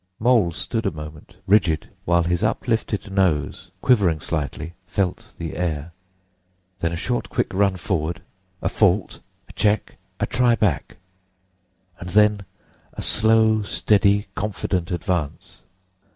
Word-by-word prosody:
Mole 115 -7 +4
stood 115 +7 -2
a - - +1
moment 75 -1 -10
rigid, 90 -6 +2
while 85 0 +3
his 85 +2 0
uplifted 110 -2 -1
nose, 85 -7 0
quivering 100 -11 +4
slightly, 80 +1 -4
felt 100 +4 -2
the 85 -2 -5
air. 80 -2 -2 0.9
Then 85 - 0
a - - -2
short, - - -2
quick - - -1
run 100 0 +2
forward—a 90 +3 -4
fault—a 100 -2 -1
check—a 105 0 -1
try 120 -1 +3
back; 105 -4 -1 1.0
and 90 - -7
then 105 0 +3 0.5
a - - -6
slow, 110 0 +3
steady, 100 0 +2
confident 95 -4 -2
advance. 90 -4 -3
95 Hz, 115 wpm, -23 LUFS, 85-105 Hz, 1.0 s, Mole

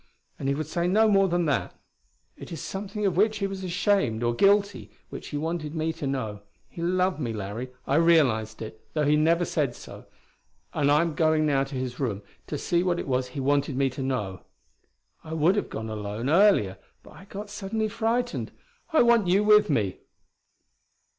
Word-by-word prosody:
And 135 - -3
he 140 - +1
would 155 +2 -3
say 170 +3 -1
no 215 +4 +4
more 195 -2 +4
than 175 -1 0
that. 145 -3 -1 0.6
It - - -11
is 165 - -5
something 205 +4 -4
of 190 -4 +1
which 215 +3 +2
he 200 - -1
was 195 -1 -5
ashamed, 180 - +1
or 120 0 +1
guilty, 200 - +2 0.2
which - - -7
he 145 - -4
wanted 160 0 -3
me 160 0 -1
to 145 - -5
know. 110 -7 -3 0.3
He 170 - -9
loved 185 +1 +1
me, 120 -6 -2
Larry. 105 +4 -5 0.2
I 140 - +1
realized 130 -11 +3
it, 110 0 -10
though 150 -1 +1
he 150 +1 +4
never 165 +3 +3
said 140 -8 -1
so. - - -11 0.7
And 145 -1 +2
I'm 160 +2 +3
going 155 0 +2
now 140 -2 +2
to 135 0 -8
his 125 -1 -4
room, 105 -7 -2 0.2
to - - -3
see 170 0 0
what 180 -1 0
it - - -5
was 130 -1 0
he 125 +2 -7
wanted 140 0 +1
me 135 -1 +1
to 135 - -6
know. 105 -8 -3 0.8
I 160 - -7
would 160 +4 +3
have 205 - -2
gone 110 - -5
alone, 110 +4 -3
earlier; 170 - +4 0.2
but - - -15
I 190 - -14
got 205 +1 -8
suddenly 210 +2 -2
frightened; 230 +3 -1 0.4
I 315 - +5
want 235 -5 +4
you 190 +4 +3
with 210 -2 +5
me." 105 -10 0
155 Hz, 195 wpm, -26 LUFS, 130-195 Hz, 0.8 s, I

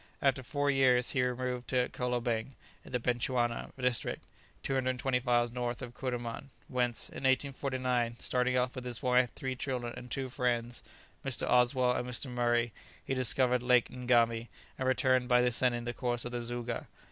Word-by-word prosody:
After 135 -1 +2
four 145 +2 0
years 125 -3 +5
he 130 - +1
removed 125 0 -2
to 125 -1 +2
Kolobeng 120 0 -2 0.3
in - - -13
the 125 - 0
Bechuana 120 0 0
district, 125 -2 -1 0.4
225 130 -1 0
miles 120 -2 +2
north 120 +1 -3
of 120 -1 -7
Kuruman, 120 0 -4 0.2
whence, 125 -2 0
in - - -10
1849, 130 -3 +1
starting 125 +1 +1
off 125 0 +1
with 130 - -6
his 125 -2 -5
wife, 125 -1 +3
three 130 -1 -3
children, 125 -2 -3
and 125 - -9
two 135 +2 -2
friends, 120 -1 -1 0.4
Mr. 135 -2 -2
Oswell 125 +1 +4
and 125 0 -2
Mr. 125 +1 -3
Murray, 120 -1 +1 0.3
he - - -1
discovered 125 0 +2
Lake 125 -1 +4
Ngami, 120 -2 +2 0.3
and 130 - 0
returned 130 -1 +3
by 125 -1 +5
descending 125 0 +1
the 120 0 -3
course 120 -1 -1
of 120 - -4
the 120 -1 -3
Zouga. 120 0 -4
125 Hz, 165 wpm, -32 LUFS, 120-130 Hz, 0.4 s, years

